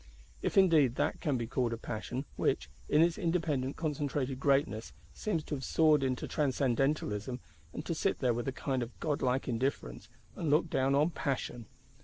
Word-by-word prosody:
If - - -1
indeed 160 -10 +5
that - - -1
can 145 -4 +1
be 120 - -2
called 120 0 0
a - - -3
passion, 120 +4 -4
which, - - 0 0.2
in 150 +2 +5
its 170 +4 +1
independent 160 -7 0
concentrated 145 -4 -2
greatness, 135 -5 +1 0.2
seems 170 -8 -2
to - - -6
have 135 -2 -3
soared 155 +1 +4
into 130 -2 -1
transcendentalism; 130 -4 0 0.3
and 150 - -6
to 170 - -1
sit 190 +4 0
there 125 -3 +2
with 120 +2 -3
a - - +1
kind 130 0 -2
of 120 0 -6
godlike 135 -4 0
indifference, 120 - -2 0.3
and 160 - -2
look 155 +3 +3
down 135 +1 +2
on 150 +4 +3
passion! 125 -7 -3
135 Hz, 175 wpm, -32 LUFS, 125-155 Hz, 0.3 s, indeed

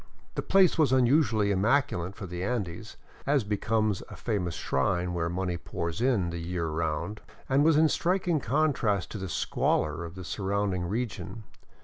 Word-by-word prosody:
The - - -2
place 190 -3 +4
was 150 -4 +4
unusually 125 -5 +3
immaculate 100 -3 +1
for 95 - -7
the 90 0 -5
Andes, 105 -2 -3 0.3
as 140 -3 +3
becomes 105 0 0
a - - -9
famous 90 -8 -2
shrine 90 +6 0
where 85 -1 -1
money 90 0 -2
pours 85 +3 -4
in 110 -9 +2
the 85 - -4
year 85 0 -3
around, 80 +5 -2 0.3
and 135 +2 +3
was 160 -1 +5
in 160 - +6
strik 180 +4 +1
ing 165 -3 +3
contrast 125 - +1
to 105 - -5
the 95 -1 -5
squalor 85 - 0
of 85 +1 -8
the 95 - -7
surrounding 95 -1 -1
region. 115 +2 -4
100 Hz, 165 wpm, -28 LUFS, 90-130 Hz, 0.3 s, in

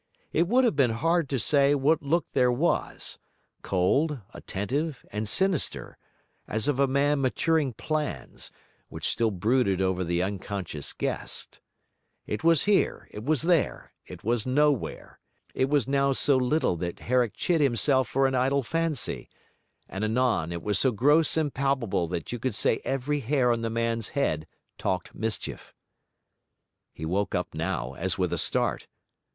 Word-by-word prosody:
It 170 +2 +2
would 250 +6 +3
have 235 - +2
been 135 -4 +3
hard 165 +1 +1
to 135 - 0
say 140 +3 +3
what 145 +3 +2
look 155 +2 0
there 125 -1 +3
was, 145 +8 -1 0.4
cold, 135 - +1
attentive, 135 +9 -3
and 105 +1 -3
sinister, 190 - +1 0.5
as 110 +4 0
of 145 -2 0
a 140 - +4
man 140 +2 +2
maturing 145 +1 +1
plans, 155 +6 -4 0.4
which - - -4
still 115 -1 +1
brooded 105 0 +1
over 95 -1 0
the 85 +1 0
unconscious 95 -6 -4
guest; - - -4 0.7
it 105 - -4
was 165 -2 +4
here, 205 -1 +1
it 105 - -8
was 155 +2 +1
there, 170 -2 0
it 90 -2 -11
was 115 0 +1
nowhere; 145 -1 0 0.3
it 130 - 0
was 145 -4 +2
now 140 0 +2
so 140 +1 +4
little 130 - +1
that 85 +1 -5
Herrick 125 -2 +1
chid 170 -3 +1
himself 130 -1 +3
for 135 +4 +1
an 135 - +1
idle 135 +2 +1
fancy; 165 +1 -2 0.6
and 95 +2 -5
anon 110 -7 +1
it 85 -1 -5
was 105 -2 +2
so 130 - +5
gross 145 +9 +3
and 150 -3 0
palpable 130 -10 0
that 85 -1 -4
you 120 - -4
could 125 -2 -1
say 110 - +3
every 135 +2 -1
hair 130 -1 +1
on 115 -1 0
the 115 - -2
man's 115 -1 -1
head 80 - 0 0.3
talked 90 -2 -2
mischief. 110 -1 -4 1.2
He 80 - -7
woke 95 +5 -1
up - - -2
now, 80 -5 -3
as 85 +5 -1
with 90 -3 0
a - - -1
start. - - 0
130 Hz, 160 wpm, -27 LUFS, 105-145 Hz, 1.2 s, so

